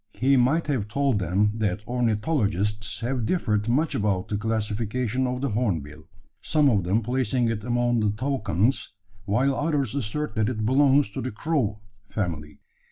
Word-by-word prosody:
He 135 +2 +3
might 135 +6 +3
have 130 -9 -1
told 135 0 +1
them 100 +4 +1
that 105 -1 -1
ornithologists 105 - 0
have 125 0 -1
differed 110 - 0
much 145 +6 +1
about 100 -3 0
the 105 - -1
classification 115 +3 -1
of 125 0 -3
the 140 - 0
hornbill 80 - -2 0.3
some 150 -3 +3
of 100 -5 +1
them 105 +6 +1
placing 125 0 0
it 110 -2 -3
among 120 0 +1
the 105 -1 +2
toucans, 125 - 0 0.3
while 125 +7 +2
others 145 -5 0
assert 140 +3 -3
that 110 +1 +2
it 110 -4 -2
belongs 135 0 +4
to 130 - -4
the 130 - -3
crow 110 -4 -1 0.3
family. 80 -7 -4
115 Hz, 160 wpm, -25 LUFS, 105-130 Hz, 0.3 s, belongs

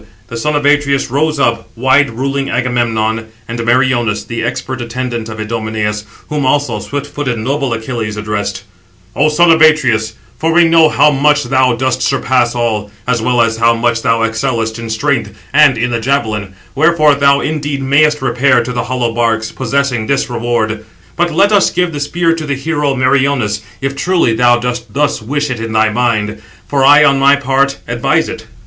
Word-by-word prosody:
The 115 - -6
son 150 +6 -1
of 145 - -1
Atreus 145 -3 +1
rose 150 +2 0
up, 115 -4 0
wide 130 +4 +3
ruling 135 +4 -3
Agamemnon, 115 -3 -1 0.2
and 115 0 -5
Meriones, 120 -3 +1
the 120 -1 -5
expert 130 -1 -4
attendant 120 -1 -4
of 110 0 -8
Idomeneus; 110 -1 -3 0.2
whom 150 -2 -2
also 130 -4 0
swift 140 +5 -5
footed, 145 -4 -4
noble 135 +4 -2
Achilles 115 -2 -4
addressed: 105 -2 -4 0.5
"O 150 +2 +2
son 165 +3 +4
of 160 0 +3
Atreus, 115 -9 +3 0.3
for 165 +1 0
we 175 +1 +5
know 165 -1 +5
how 150 +1 +3
much 145 +1 +2
thou 130 -1 +1
dost 130 +1 -1
surpass 125 -2 +1
all, 110 -3 -2 0.2
as 120 -2 0
well 125 +1 +1
as 115 -1 -1
how 115 +1 +3
much 115 0 0
thou 115 0 +1
excellest 115 0 -2
in 115 -1 -6
strength 110 -2 -2 0.2
and 145 -3 +5
in 125 +2 -1
the 115 - -1
javelin, 110 -7 -2 0.2
wherefore 155 0 +3
thou 140 0 +3
indeed 145 -2 -3
mayest 150 +1 +2
repair 125 0 +2
to 125 - -5
the 120 -1 -2
hollow 125 -2 -2
barks, 115 -2 -1
possessing 130 -3 -1
this 135 -2 -1
reward; 115 -2 -2 0.3
but 175 0 0
let 200 +6 +3
us 205 -2 +4
give 180 -2 -1
the 145 - -4
spear 165 +3 0
to 160 -2 -5
the 140 - -1
hero 145 0 -1
Meriones, 130 -5 +1 0.2
if, 135 0 -2
truly, 170 -5 +1
thou 120 +1 +3
dost 120 -1 -4
thus 145 -4 0
wish 145 +5 -2
it 120 - -4
in 115 0 -5
thy 110 0 +3
mind; 110 -2 -1 0.3
for 140 -2 0
I 145 +2 +7
on 140 -2 +3
my 140 +1 +5
part 140 0 0
advise - - 0
it." - - -8
125 Hz, 185 wpm, -14 LUFS, 115-145 Hz, 0.5 s, I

